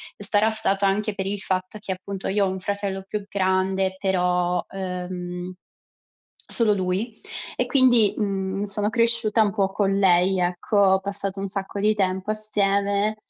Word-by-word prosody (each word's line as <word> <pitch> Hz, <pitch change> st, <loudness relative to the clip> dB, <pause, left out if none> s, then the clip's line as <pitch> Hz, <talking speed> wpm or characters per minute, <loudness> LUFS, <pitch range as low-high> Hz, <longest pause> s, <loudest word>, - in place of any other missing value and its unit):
Sarà 205 Hz, +2 st, +1 dB
stato 200 Hz, -2 st, 0 dB
anche 205 Hz, +2 st, 0 dB
per 190 Hz, -2 st, -3 dB
il 200 Hz, 0 st, -2 dB
fatto 185 Hz, +2 st, -3 dB
che, 195 Hz, -2 st, -3 dB
appunto, 190 Hz, +1 st, -6 dB
io 200 Hz, 0 st, +2 dB
ho -, -, 0 dB
un 190 Hz, 0 st, -4 dB
fratello 200 Hz, 0 st, -3 dB
più 205 Hz, -1 st, -4 dB
grande, 190 Hz, -1 st, 0 dB
però, 180 Hz, -2 st, +1 dB
uhm, 180 Hz, -1 st, -5 dB, 1.0 s
solo 220 Hz, -3 st, +4 dB
lui, 195 Hz, +4 st, -2 dB, 0.4 s
e -, -, 0 dB
quindi, 245 Hz, -6 st, +4 dB
mhmm, 195 Hz, -1 st, -2 dB
sono 205 Hz, +1 st, -1 dB
cresciuta 230 Hz, -1 st, +2 dB
un 205 Hz, -2 st, +1 dB
po' 195 Hz, -2 st, 0 dB
con 195 Hz, -1 st, +1 dB
lei, 185 Hz, 0 st, +4 dB
ecco. 180 Hz, +3 st, -1 dB
Ho 190 Hz, -1 st, +5 dB
passato 195 Hz, 0 st, -4 dB
un 195 Hz, -, -3 dB
sacco 195 Hz, +1 st, -4 dB
di 215 Hz, +1 st, +3 dB
tempo 190 Hz, 0 st, -1 dB
assieme; 205 Hz, 0 st, 0 dB
195 Hz, 160 wpm, -24 LUFS, 190-210 Hz, 1.0 s, Ho